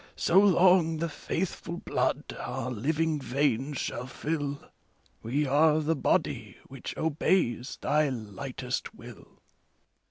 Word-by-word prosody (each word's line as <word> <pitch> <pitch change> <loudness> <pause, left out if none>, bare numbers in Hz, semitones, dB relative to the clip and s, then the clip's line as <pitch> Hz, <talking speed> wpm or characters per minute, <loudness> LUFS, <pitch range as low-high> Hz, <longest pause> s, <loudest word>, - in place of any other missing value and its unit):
So 185 - +4
long 180 -4 +5
the 165 +2 -1
faithful 170 +2 -4
blood - - -1
our 125 - -4
living 155 +6 0
veins 135 +1 0
shall 125 +1 -3
fill. 145 +1 -3 0.6
We 140 +6 0
are 150 +3 +4
the 155 +1 +1
body - - 0
which 135 -1 -8
obeys 150 -5 0
thy 150 0 +2
lightest 125 +2 -5
will. - - -13
150 Hz, 115 wpm, -28 LUFS, 130-160 Hz, 0.6 s, long